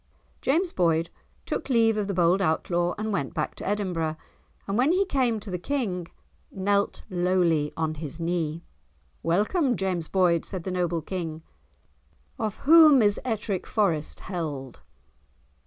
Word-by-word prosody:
James 340 +6 +1
Boyd 165 -2 +1 0.3
took - - -3
leave 225 -3 +4
of 210 -2 -1
the 200 - -2
bold 175 +2 +3
Outlaw 175 0 0
and 215 0 -2
went 140 -8 -2
back 150 - -2
to - - -8
Edinburgh, 180 -6 -1 0.5
and 195 - -1
when 260 +8 +3
he 390 +2 +2
came 255 - +1
to 200 -1 -8
the 180 - -3
King, 185 -7 -2 0.4
knelt 200 +1 0
lowly 175 -5 +1
on 160 -1 -1
his 155 +1 -7
knee. 165 -1 -2 0.6
"Welcome, 240 - +1
James 180 -4 -2
Boyd," 175 -3 +2
said 185 -4 -5
the 185 - -4
noble 175 -3 -1
King, 165 -3 -5 1.0
"of 215 -3 -2
whom 305 -4 +8
is 205 -1 +2
Ettrick 215 -5 -2
Forest 170 -8 0
held?" 150 -9 -5
185 Hz, 145 wpm, -26 LUFS, 165-215 Hz, 1.0 s, whom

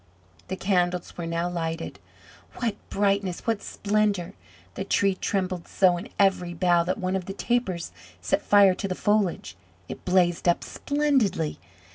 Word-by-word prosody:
The - - -3
candles 180 -2 0
were 170 -1 -5
now 170 +1 -1
lighted. 165 -2 -4 0.6
What 235 -4 -1 0.2
brightness! 195 -2 0
What 225 -3 0
splendour! 200 -3 0 0.4
The - - -4
Tree 195 -1 +2
trembled 185 -2 -2
so 185 -2 +3
in 175 - -7
every 185 -3 +2
bough 175 0 +3
that 185 - -1
one 185 -2 -1
of 185 -2 -2
the 195 - -5
tapers 215 -6 -1 0.3
set - - 0
fire 200 -2 +6
to 195 - -4
the 185 - -3
foliage. 200 - 0 0.3
It - - -8
blazed 180 -2 +2
up 175 - +3
splendidly. 265 - 0
185 Hz, 150 wpm, -26 LUFS, 175-200 Hz, 0.6 s, fire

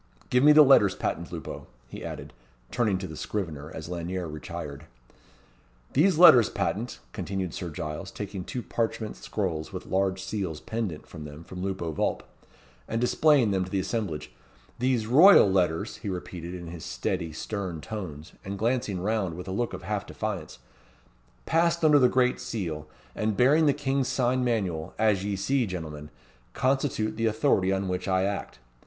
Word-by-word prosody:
Give 125 +1 +4
me 150 - +8
the 150 0 +9
letters 120 -9 +6
patent, 85 0 -3
Lupo," 80 -6 -7 0.2
he - - -9
added, - - -7 0.4
turning 110 -6 +1
to 95 0 -5
the 80 - -8
scrivener, 80 -6 -4
as 80 - -7
Lanyere 90 +1 -4
retired. 75 -1 -7 1.1
"These 165 +4 +4
Letters 155 - +8
Patent," 115 +3 -2 0.2
continued 95 -3 -3
Sir 90 - -4
Giles, 75 0 -5
taking 100 -2 -6
two 125 +6 -5
parchment 115 -2 -2
scrolls 85 -7 -3
with - - -6
large 95 0 0
seals 95 -5 -3
pendent 110 -9 -4
from 80 -3 -9
them 75 +2 -9
from 90 +1 -8
Lupo 95 -4 -2
Vulp, 75 - -1 0.6
and 115 - -1
displaying 125 -1 +4
them 95 -1 +1
to 90 - -7
the 95 - 0
assemblage, 90 -8 -3 0.5
"these 125 -3 +1
Royal 155 - +8
Letters," 95 +1 +1
he 105 - -5
repeated 90 -1 -6
in 90 -1 -7
his 85 -1 -8
steady, 90 -4 -2
stern 95 0 -4
tones, 85 -5 -7
and 100 +1 -5
glancing 115 -4 0
round 100 -4 -1
with 90 +2 -8
a - - -4
look 120 +5 -1
of 95 0 -7
half 105 +1 -3
defiance, 100 -8 -4 0.9
"passed 170 0 +2
under 150 -2 +7
the 125 -2 +5
great 125 0 +2
seal, 80 -9 -4 0.3
and 110 -2 -1
bearing 150 +6 +5
the - - +6
king's 135 -2 0
sign 125 0 +1
manual, 95 -9 -1
as 105 -3 +2
ye 100 0 -1
see, 125 +5 +1
gentlemen, 75 -5 -6 0.4
constitute 130 -5 0
the 115 0 +1
authority 110 -4 +2
on 95 0 0
which 90 +1 -3
I 95 -1 +2
act. 100 +1 -3
100 Hz, 170 wpm, -27 LUFS, 85-120 Hz, 1.1 s, the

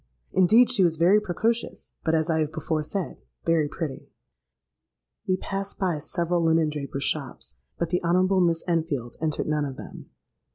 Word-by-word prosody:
Indeed 215 +7 +5
she 215 -7 +3
was 170 -2 +3
very 175 +6 +5
precocious, 225 +4 -2
but, 160 0 +2
as 160 +1 +1
I 160 -2 +1
have 155 -1 0
before 160 -1 -2
said, 180 +3 -4 0.2
very 165 -3 +3
pretty. 150 -2 -5 1.2
"We 185 -1 +2
passed 195 +1 -5
by 180 -5 0
several 170 +3 -1
linen 160 -1 +3
drapers' 140 -2 -4
shops; - - -2 0.2
but 170 - -1
the 180 +1 0
Honourable 185 +2 +3
Miss 165 -2 +2
Enfield 155 -8 -1
entered 155 -2 -1
none 150 -1 0
of 135 -2 -5
them. - - -10
165 Hz, 165 wpm, -26 LUFS, 155-185 Hz, 1.2 s, Indeed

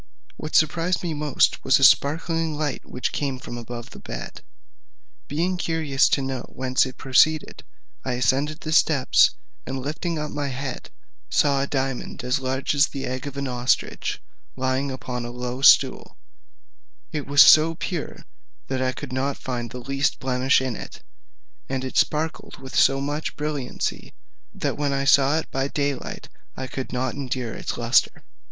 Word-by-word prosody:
What 155 - -6
surprised 165 +3 +2
me 170 -2 -2
most 150 -2 +1
was - - +5
a - - 0
sparkling 165 +2 +3
light 150 -3 -2
which 125 - -2
came 140 -3 -2
from 125 - -8
above 120 0 -7
the - - -11
bed. - - -7 0.9
Being 175 +6 -1
curious 160 -5 +1
to 140 - +1
know 135 -2 -3
whence 130 +1 +1
it 130 - -10
proceeded, 150 +4 +2 0.4
I 130 - -2
ascended 140 +5 0
the 155 - -4
steps, 155 -4 +4 0.3
and 135 - -4
lifting 155 +5 -3
up 150 0 -4
my 145 -1 -2
head, 135 -1 -5 0.4
saw 140 -2 +2
a 140 - -1
diamond 135 -3 -3
as 125 +3 0
large 130 +1 -1
as 145 0 +4
the 135 -1 -5
egg 130 +2 -4
of 140 -1 -7
an 140 0 -2
ostrich, 125 0 -1 0.4
lying 130 +1 -1
upon 125 -2 -5
a 120 - -5
low 125 +1 -5
stool; - - +5 0.9
it 150 -2 -4
was 145 0 +8
so 160 +1 +7
pure, 170 -1 -5 0.4
that 130 -1 -1
I 130 0 0
could 135 -1 -7
not 135 +2 -1
find 120 -2 -4
the 125 - -8
least 135 +3 -1
blemish 130 +1 +2
in 130 -3 -2
it, - - -9 0.7
and 130 -1 -2
it 130 - -6
sparkled 155 +1 0
with 130 0 -9
so 135 0 +4
much 145 +2 -3
brilliancy, 150 -4 -4 0.4
that - - -3
when 145 -1 0
I 135 0 -1
saw 140 +2 +5
it 160 - -4
by 135 +1 -1
day 140 0 0
light 130 - -8 0.3
I 130 - -4
could 130 +1 -6
not 130 -1 -1
endure 130 -4 -4
its - - -5
lustre. - - +2
135 Hz, 170 wpm, -24 LUFS, 130-150 Hz, 0.9 s, was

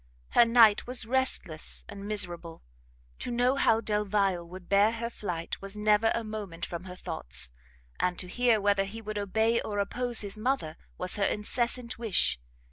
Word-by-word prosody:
Her 240 - +6
night 230 -3 +5
was 250 -2 +1
restless 240 -10 -1
and 200 0 -8
miserable: 175 -5 -2 0.6
to - - -4
know 245 +2 +2
how 225 -4 +3
Delvile 205 -4 0
would 180 +1 -11
bear 205 +3 +4
her 230 +1 -4
flight 175 -7 -5
was 195 +1 -5
never 210 +1 +3
a 230 - -2
moment 205 -6 -5
from 170 +1 -6
her 180 -1 -8
thoughts, - - -3 0.5
and 180 -1 0
to 180 - -2
hear 235 +3 +2
whether 200 -1 +2
he 210 +3 -7
would 215 -1 -4
obey 220 +4 +1
or 205 - -4
oppose 240 +4 0
his 205 0 -2
mother 225 - -1 0.2
was 180 +2 -2
her 200 - +2
incessant 235 +3 -1
wish. 200 - +2
210 Hz, 170 wpm, -29 LUFS, 185-230 Hz, 0.6 s, Her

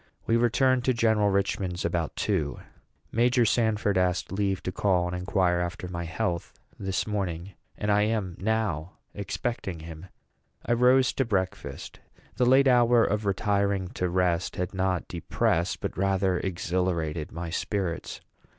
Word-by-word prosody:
We 115 - +2
returned 125 +2 +3
to 130 - +2
General 110 -3 +3
Richman's 95 -2 -1
about 85 -2 -1
two. 85 -9 -1 0.5
Major 120 +1 +3
Sanford 105 -3 +2
asked 90 0 0
leave 95 -1 -1
to 95 - -2
call 90 -2 +1
and 90 +1 -3
inquire 90 -1 +1
after 90 +1 -3
my 85 -1 -4
health 85 +1 -3 0.2
this 95 -3 -1
morning; 95 -4 -3 0.3
and 105 0 0
I 105 0 +4
am 100 -6 -2
now 95 -6 -1 0.2
expecting 100 -3 -4
him. 80 +2 -9 0.6
I - - +2
rose 125 +2 +4
to 135 - +1
breakfast. 95 -6 -3 0.4
The 125 -1 +3
late 135 +2 +6
hour 120 -2 +5
of 105 0 -1
retiring 100 -1 0
to 90 0 -2
rest 90 -1 0
had 90 +2 -3
not 95 -2 -1
depressed, 85 0 -1
but - - -3
rather 95 -1 +1
exhilarated, 85 -4 -2
my 85 0 -5
spirits. 95 -2 -3
95 Hz, 145 wpm, -27 LUFS, 90-110 Hz, 0.6 s, late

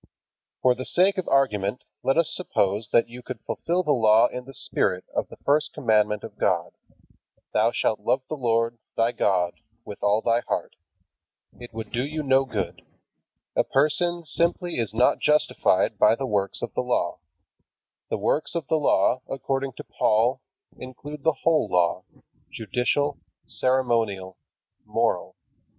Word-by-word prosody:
For 125 - +5
the 130 - -6
sake 185 +7 +3
of 185 - -4
argument 110 -6 +1 0.2
let 135 - +1
us 165 -2 +3
suppose 105 - 0
that 115 - +4
you 120 +2 -10
could - - -7
fulfill 175 +2 -1
the 150 - +1
Law 110 -3 +5
in 125 0 -7
the 135 - -11
spirit 90 -1 -1
of - - -1
the - - -13
first 150 +2 +2
commandment 105 -3 +1
of - - -10
God: - - +1 0.8
"Thou 110 +2 +3
shalt 110 - 0
love 130 +6 0
the 155 - -4
Lord, 115 -3 0 0.2
thy 115 +1 +3
God, 90 -6 0 0.3
with 105 - -9
all 105 +2 +2
thy 115 0 +3
heart." - - -3 0.8
It 120 -1 -10
would 110 -1 -7
do 120 - -1
you 155 +2 -4
no 135 -1 +3
good. 95 -7 -4 0.7
A - - +3
person 165 +5 +1
simply 170 0 0
is 115 -5 -1
not 115 +3 +3
justified 150 0 +2
by - - +6
the 135 - -3
works 100 -5 -1
of - - -4
the - - 0
Law. 125 -8 -1 0.9
The - - -1
works 155 - -1
of 165 -3 -2
the 160 - +3
Law, 130 -2 +2
according 135 0 -2
to - - -9
Paul, 120 +5 +1 0.4
include 145 +3 -9
the 160 -2 +2
whole 165 -2 +3
Law, 85 -1 +1 0.5
judicial, 125 +6 -1 0.3
ceremonial, 115 -8 0 0.5
moral. - - -1
125 Hz, 155 wpm, -25 LUFS, 110-145 Hz, 0.9 s, by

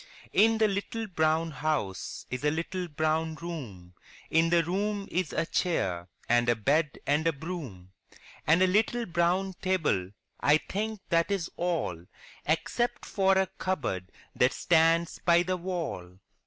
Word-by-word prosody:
In 225 +2 +5
the 220 -1 +4
little 210 +3 -3
brown 160 -3 +1
house 150 -10 -3
is 125 +2 -3
a 150 - +4
little 175 +4 -3
brown 155 +1 0
room, 125 - -7 0.4
In 165 +1 +4
the 170 0 +4
room 200 +3 -2
is 180 -2 -1
a 155 - 0
chair 90 - -1 0.2
and 120 0 +3
a 120 - +4
bed 140 +7 +1
and 150 +3 +2
a - - +4
broom, 140 - -7 0.6
And 165 +4 +5
a - - +7
little 220 +5 +2
brown 180 +2 +1
table; 160 - +1 0.3
I 145 +2 +5
think 215 +5 -4
that 170 +1 +2
is 195 -4 -1
all, 165 - -2 0.4
Except 165 +10 0
for 195 -1 +2
a 190 - +4
cupboard 120 - -2 0.2
that 125 +2 +3
stands 165 0 +3
by 170 0 +5
the 185 +1 -1
wall. 165 - -4
165 Hz, 150 wpm, -29 LUFS, 145-185 Hz, 0.6 s, a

